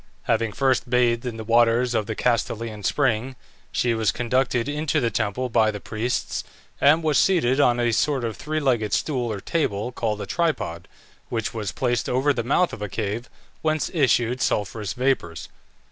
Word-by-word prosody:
Having 115 -2 0
first 130 -2 +1
bathed 120 0 +2
in 115 -2 -4
the 110 - -5
waters 120 +2 +3
of 110 -3 0
the 110 - -3
Castalian 115 -2 -1
spring, 130 +2 0 0.4
she 120 -1 +1
was 110 -1 +1
conducted 125 0 0
into 150 +1 0
the 120 -4 0
temple 110 +3 -1
by 110 -2 +3
the 105 -1 -4
priests, 110 +4 -2 0.4
and 155 +4 +5
was 155 -2 +3
seated 145 -9 +3
on 120 -4 +4
a 120 -1 +2
sort 135 +2 +1
of 115 -2 -2
three 155 +9 -3
legged 120 -8 0
stool 125 -6 0
or 105 - -4
table, 110 - -1
called 110 -3 -2
a - - -4
tripod, 150 - -2 0.4
which 115 -3 -2
was 105 -5 -3
placed 120 +4 -1
over 135 +3 +2
the 120 - -1
mouth 155 +9 +2
of - - -7
a 105 - -3
cave 110 +3 -3 0.3
whence 155 -1 0
issued 125 -5 +2
sulphurous 105 -1 -1
vapours. 125 -11 -1
120 Hz, 175 wpm, -24 LUFS, 110-135 Hz, 0.4 s, and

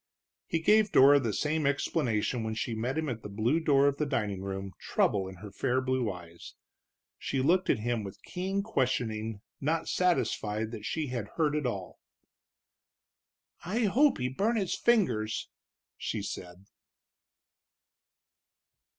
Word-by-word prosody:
He - - 0
gave 210 +5 +4
Dora 140 +2 +7
the 120 -5 -1
same 150 +5 0
explanation 120 -4 0
when 110 0 -3
she 115 +1 -2
met 120 +6 -2
him 160 -1 -1
at 120 -4 -4
the 105 - -7
blue 115 +10 +1
door 140 -4 +4
of 140 0 +1
the 150 - 0
dining 105 -8 -1
room, 95 0 -4
trouble 95 -2 +1
in 95 - -8
her 100 +3 -10
fair 125 +5 0
blue 130 -4 0
eyes. 85 -2 -11 0.6
She 135 - -2
looked 175 +8 +2
at - - +4
him 115 0 -1
with 100 -1 -8
keen 190 +2 -2
questioning, 115 - -1 0.2
not 160 +3 0
satisfied 110 -11 0
that 110 -2 -6
she 150 +4 -2
had 120 -5 -3
heard 155 -3 +2
it 150 -4 0
all. 100 -6 -5 1.6
"I 210 +7 -1
hope 265 +8 +4
he 125 - -1
burnt 205 - 0
his 195 -4 0
fingers," 110 - +1 0.5
she 105 -3 -3
said. 90 -1 -7
125 Hz, 150 wpm, -30 LUFS, 110-160 Hz, 1.6 s, Dora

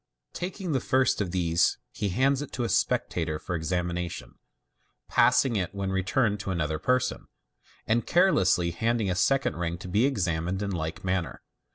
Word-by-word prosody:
Taking 180 0 -4
the 135 - +2
first 130 -2 +2
of 100 - -1
these, 85 -2 +1
he 105 - -2
hands 135 +7 +2
it 145 - -7
to 125 - -2
a 115 - -1
spectator 80 -3 0
for 90 - -6
examination 90 +1 -3
j - - -28 0.7
passing 125 -4 +3
it 95 -1 -2
when 100 -1 -2
returned 100 +3 +1
to 100 - -5
another 80 -4 -1
person, 130 +7 0 0.6
and 115 +2 +1
carelessly 95 - +3
handing 110 +2 0
a - - -1
second 135 - +1
ring 85 0 -2
to 90 - -9
be 105 +8 +3
examined 90 -5 -1
in 100 - -2
like 80 -3 -4
manner. 95 -2 -2
95 Hz, 170 wpm, -27 LUFS, 85-125 Hz, 0.7 s, passing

